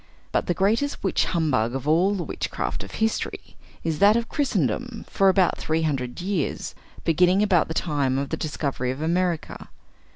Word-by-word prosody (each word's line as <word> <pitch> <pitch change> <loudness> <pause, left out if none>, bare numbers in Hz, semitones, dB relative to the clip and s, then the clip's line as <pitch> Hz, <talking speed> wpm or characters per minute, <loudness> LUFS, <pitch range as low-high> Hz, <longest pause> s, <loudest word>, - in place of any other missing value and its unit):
But - - 0
the 175 - +1
greatest 225 +9 0
witch 190 - +1
humbug 130 -9 0
of 135 +2 -4
all 180 +6 +3
the 180 - -2
witchcraft - - -3
of - - -11
history, 220 0 -2 0.3
is 160 -2 -1
that 205 +2 +6
of 235 0 -1
Christendom 245 - -1
for 195 0 +3
about 190 -1 +3
three 160 +1 0
hundred 130 -5 -2
years, 180 -4 -2 0.3
beginning 180 +4 +3
about 185 -6 +3
the 160 - -5
time 140 -5 0
of 140 0 -2
the - - -1
discovery 140 -5 -2
of 130 +4 -3
America. 170 -1 -1
170 Hz, 170 wpm, -24 LUFS, 150-195 Hz, 0.3 s, that